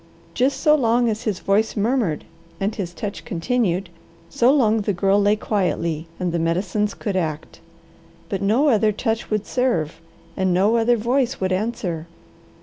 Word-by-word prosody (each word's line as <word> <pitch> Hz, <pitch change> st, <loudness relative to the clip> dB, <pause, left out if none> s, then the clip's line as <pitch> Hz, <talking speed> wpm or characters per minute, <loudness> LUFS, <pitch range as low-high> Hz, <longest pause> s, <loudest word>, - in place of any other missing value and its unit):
Just 265 Hz, +2 st, +1 dB
so 300 Hz, -2 st, +5 dB
long 240 Hz, -4 st, +3 dB
as 220 Hz, +2 st, -3 dB
his 205 Hz, -5 st, -2 dB
voice 215 Hz, +3 st, +1 dB
murmured 210 Hz, -, 0 dB, 0.3 s
and 200 Hz, +2 st, -1 dB
his 185 Hz, -4 st, -4 dB
touch 200 Hz, +3 st, -6 dB
continued, 185 Hz, -1 st, -1 dB, 0.4 s
so 255 Hz, -2 st, +4 dB
long 225 Hz, -6 st, +3 dB
the 205 Hz, 0 st, -1 dB
Girl 195 Hz, +3 st, +2 dB
lay 205 Hz, +1 st, +3 dB
quietly, 170 Hz, -6 st, -1 dB
and 180 Hz, -2 st, -1 dB
the 170 Hz, -, -1 dB
medicines 185 Hz, +5 st, 0 dB
could 200 Hz, -3 st, -3 dB
act. 160 Hz, -4 st, -3 dB, 0.7 s
But 195 Hz, -, -3 dB
no 230 Hz, +9 st, +3 dB
other 215 Hz, -3 st, +3 dB
touch 225 Hz, +2 st, -2 dB
would 215 Hz, -1 st, -1 dB
serve, 165 Hz, -, -1 dB, 0.3 s
and 185 Hz, -2 st, +1 dB
no 200 Hz, +5 st, +3 dB
other 235 Hz, +1 st, +3 dB
voice 250 Hz, +3 st, 0 dB
would 185 Hz, 0 st, -1 dB
answer. 185 Hz, -5 st, -2 dB
205 Hz, 160 wpm, -22 LUFS, 185-235 Hz, 0.7 s, so